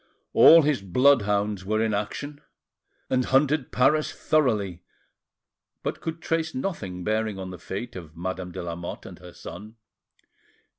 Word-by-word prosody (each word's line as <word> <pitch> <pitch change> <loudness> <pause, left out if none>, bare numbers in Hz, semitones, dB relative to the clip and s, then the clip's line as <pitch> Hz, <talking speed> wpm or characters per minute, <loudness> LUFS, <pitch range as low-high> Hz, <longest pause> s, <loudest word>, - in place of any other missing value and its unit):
All 165 -1 +8
his 145 -7 +1
bloodhounds 105 -2 +2
were 110 +3 0
in 110 -1 +1
action, 145 +8 -4 0.7
and 130 -1 +1
hunted 135 0 +2
Paris 150 +4 +3
thoroughly, 105 - 0 1.0
but - - -3
could 165 0 -5
trace 165 -1 -1
nothing 105 - -4
bearing 110 0 -1
on 95 -1 -6
the 90 - -9
fate 110 +9 -6
of 80 -3 -10
Madame 90 +1 -4
de 85 - -6
Lamotte 85 0 -6
and - - -10
her - - -12
son. 105 +6 -10
110 Hz, 140 wpm, -25 LUFS, 95-140 Hz, 1.0 s, All